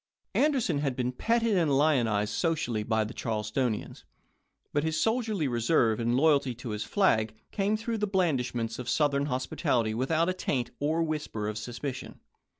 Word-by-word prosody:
Anderson 260 - +2
had 140 -3 -1
been 125 0 -1
petted 230 - +1
and 155 -7 +3
lionized 120 -9 +2
socially 150 -10 0
by 110 0 +1
the 110 +3 -6
Charlestonians; 110 +1 -2 0.7
but 145 - +1
his 160 -1 0
soldierly 220 - 0
reserve 120 -2 +2
and 120 +1 +1
loyalty 140 -4 +3
to 120 0 -7
his 105 -1 -3
flag 110 - +2 0.2
came 205 +1 +1
through 225 0 -3
the 210 - 0
blandish 160 -11 0
ments 115 0 -3
of 125 -1 -4
Southern 145 -2 +2
hospitality 125 -3 0
without 155 +8 +1
a 185 - +1
taint 130 -9 -2
or 155 +3 +1
whisper 150 -9 -3
of 105 - -3
suspicion. 125 +4 -6
135 Hz, 160 wpm, -29 LUFS, 115-165 Hz, 0.7 s, and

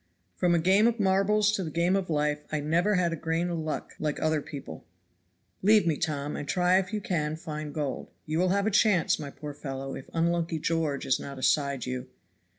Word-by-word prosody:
From 175 -1 +2
a - - +3
game 190 +6 +4
of 235 -1 0
marbles 205 +2 +3
to 200 -3 -1
the 160 - -4
game 170 +4 +1
of 195 -2 -1
life 150 -1 +1
I 155 - 0
never 170 +8 +2
had 175 -2 +1
a - - -1
grain 165 +2 -1
of 170 - -2
luck 155 -1 -4
like 150 -1 -2
other 155 -1 +1
people. 135 - -8 0.8
Leave 210 -1 +5
me, 165 -3 +2
Tom, 145 -1 -2
and 145 - -5
try 180 +3 +3
if 190 +2 -4
you 215 - -1
can 155 -6 -1
find 155 -2 -6
gold; 145 -4 -3 0.2
you 155 +2 -1
will 185 +1 +3
have 200 +2 +1
a 220 - +1
chance, 200 -4 +3
my 145 -2 -5
poor 145 +1 -8
fellow, 135 -1 -6
if 130 - -8
unlucky 170 0 0
George 155 -3 -1
is 130 - +2
not 140 -1 -7
aside 140 -1 +1
you." 125 0 -4
165 Hz, 215 wpm, -28 LUFS, 150-185 Hz, 0.8 s, Leave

